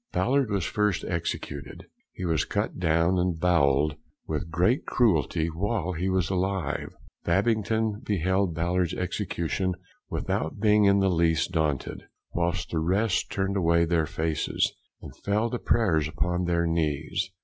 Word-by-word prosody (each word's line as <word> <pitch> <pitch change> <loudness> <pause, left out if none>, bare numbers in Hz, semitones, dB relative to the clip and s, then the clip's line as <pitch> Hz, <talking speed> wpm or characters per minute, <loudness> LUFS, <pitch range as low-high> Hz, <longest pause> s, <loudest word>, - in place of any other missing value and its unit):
Ballard 135 -1 +1
was 100 -5 0
first 105 -2 0
executed. 85 -2 -4 0.3
He 90 - -6
was 80 -3 +1
cut - - -2
down 85 +1 +2
and 90 -2 0
bowell'd 75 -4 +2 0.3
with 80 +1 -3
great 90 - +2
cruelty 80 - +2
while 95 +2 -1
he 90 +2 -2
was 95 -1 0
alive. 95 -5 -2 0.3
Babington 110 +3 +1
beheld 95 -3 0
Ballard's 85 +1 0
execution 90 -1 -2 0.3
without 80 +6 -2
being 105 -1 +4
in 100 0 +4
the 95 -1 +3
least 85 0 +2
daunted; 75 -5 -1 0.3
whilst 85 +1 -1
the 80 - 0
rest 95 +5 +1
turned 95 0 -1
away 85 -2 +3
their 80 -2 +1
faces, 80 +1 -1 0.3
and - - -10
fell 105 +3 0
to 120 - -2
prayers 85 -10 +2
upon 90 +3 -1
their 85 -1 +1
knees. 80 +3 -1
90 Hz, 140 wpm, -27 LUFS, 80-100 Hz, 0.3 s, being